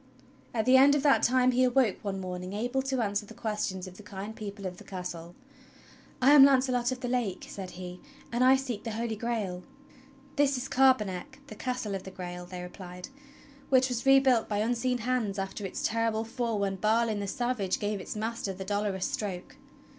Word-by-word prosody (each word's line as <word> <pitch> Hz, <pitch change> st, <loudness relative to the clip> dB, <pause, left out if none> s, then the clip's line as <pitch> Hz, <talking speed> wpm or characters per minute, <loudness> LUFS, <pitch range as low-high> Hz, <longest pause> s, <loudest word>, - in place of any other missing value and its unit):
At 220 Hz, -2 st, -1 dB
the 255 Hz, +1 st, +7 dB
end 280 Hz, +2 st, +7 dB
of 285 Hz, -, 0 dB
that 285 Hz, -2 st, +5 dB
time 255 Hz, +1 st, +4 dB
he 250 Hz, +1 st, +2 dB
aw^oke 250 Hz, -4 st, +3 dB
one 195 Hz, -2 st, -3 dB
morning 185 Hz, 0 st, -5 dB
able 245 Hz, +5 st, -1 dB
to 265 Hz, -2 st, -1 dB
answer 205 Hz, 0 st, -1 dB
the -, -, -12 dB
questions 210 Hz, -4 st, -3 dB
of 185 Hz, 0 st, -11 dB
the -, -, -11 dB
kind 205 Hz, +1 st, -7 dB
people 200 Hz, -2 st, -7 dB
of 180 Hz, -1 st, -5 dB
the -, -, -12 dB
Castle. 175 Hz, -2 st, -7 dB, 0.8 s
"I 260 Hz, +2 st, +5 dB
am 290 Hz, -2 st, +10 dB
Launcelot 255 Hz, -2 st, +4 dB
of 255 Hz, 0 st, -5 dB
the 250 Hz, -, -2 dB
Lake," 240 Hz, -6 st, -1 dB
said 190 Hz, -2 st, -7 dB
he, 180 Hz, 0 st, -7 dB, 0.3 s
"and 240 Hz, +1 st, +1 dB
I 260 Hz, +1 st, +7 dB
seek 255 Hz, -6 st, -3 dB
the 225 Hz, -, -4 dB
Holy 225 Hz, 0 st, -2 dB
Grail." 210 Hz, -5 st, -3 dB, 0.8 s
"This 280 Hz, -2 st, +3 dB
is 250 Hz, -, -4 dB
Carbonek, 260 Hz, +1 st, +1 dB
the -, -, -10 dB
Castle 250 Hz, -5 st, -3 dB
of 195 Hz, -, -3 dB
the 190 Hz, -, -9 dB
Grail," 180 Hz, -1 st, -7 dB
they 180 Hz, 0 st, -7 dB
replied, 180 Hz, +1 st, -9 dB, 0.6 s
"wLich 260 Hz, 0 st, +5 dB
was 245 Hz, -2 st, -2 dB
rebuilt 270 Hz, -3 st, +5 dB
by 205 Hz, -, 0 dB
unseen 245 Hz, +3 st, 0 dB
hands 235 Hz, -4 st, -1 dB
after 195 Hz, +1 st, -3 dB
its -, -, -6 dB
terrible 225 Hz, -1 st, 0 dB
fall 230 Hz, -1 st, -2 dB
wdien 195 Hz, -1 st, -2 dB
Balin 220 Hz, 0 st, +2 dB
the 200 Hz, -, -3 dB
Savage 240 Hz, -4 st, -1 dB
gave 205 Hz, -1 st, -2 dB
its -, -, -6 dB
master 220 Hz, -2 st, -3 dB
the 190 Hz, +1 st, -7 dB
Dolorous 205 Hz, -1 st, -1 dB
Stroke. 190 Hz, -4 st, -4 dB
220 Hz, 200 wpm, -29 LUFS, 195-255 Hz, 0.8 s, am